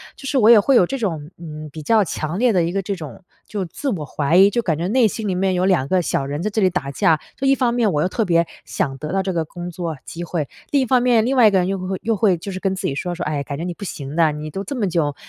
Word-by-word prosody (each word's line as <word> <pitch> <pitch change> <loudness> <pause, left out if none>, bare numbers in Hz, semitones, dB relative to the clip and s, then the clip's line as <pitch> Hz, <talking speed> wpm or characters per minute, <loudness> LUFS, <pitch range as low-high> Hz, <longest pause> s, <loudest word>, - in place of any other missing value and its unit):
就 275 - -12
是 275 0 0
我 220 -2 +5
也 235 - +9
会 250 +5 +4
有 180 - +5
这 270 - -4
种， 165 - -3
嗯， 155 -2 -8
比 155 +2 -9
较 220 +7 +4
强 160 +2 -3
烈 245 -1 +3
的 180 -3 +3
一 170 - -1
个 195 +1 -1
这 200 +1 -3
种 155 -2 -9 0.2
就 205 -2 -3
自 275 - -4
我 175 - -3
怀 145 +3 0
疑， 195 +2 +7
就 235 +4 0
感 165 -9 -1
觉 170 +3 -2
内 240 +1 +4
心 215 +1 -4
里 190 - -1
面 190 +1 +1
有 180 0 +1
2 175 -9 +2
个 185 +2 +2
小 140 - -1
人 145 +3 -4
在 215 - 0
这 215 +1 -1
里 190 - +4
打 165 -6 -3
架， 160 +3 +3 0.2
就 270 - -1
一 275 - +5
方 250 -3 +1
面 235 -3 +2
我 150 - +1
又 180 - +1
特 225 +3 -1
别 170 -2 +3 0.2
想 135 -1 -2
得 150 +3 -6
到 195 0 +1
这 190 - -2
个 165 -2 -1
工 175 +2 -7
作 170 -2 -4
机 170 - -7
会， 160 -4 -2 0.2
另 280 -2 +3
一 - - +1
方 255 0 +3
面， 240 -3 +3
另 265 +3 0
外 235 - +7
一 - - +4
个 195 - +3
人 180 - 0
又 195 - -1
会 185 - -5
会 190 -1 -3
又 225 0 +1
会 195 -4 +3
就 195 +4 -7
是 185 - -5
跟 190 0 -1
自 - - -3
己 135 - -2
说 175 +5 -3
说： 175 - -4
“唉， 150 -2 -1
感 140 0 -5
觉 160 - -4
你 175 0 -3
不 200 - -11
行 145 -5 -6
的， 160 -2 +4
你 150 +1 -6
都 195 +6 -5
这 275 - -4
么 235 -5 0
久， 155 -5 0
180 Hz, 350 characters per minute, -21 LUFS, 160-215 Hz, 0.2 s, 也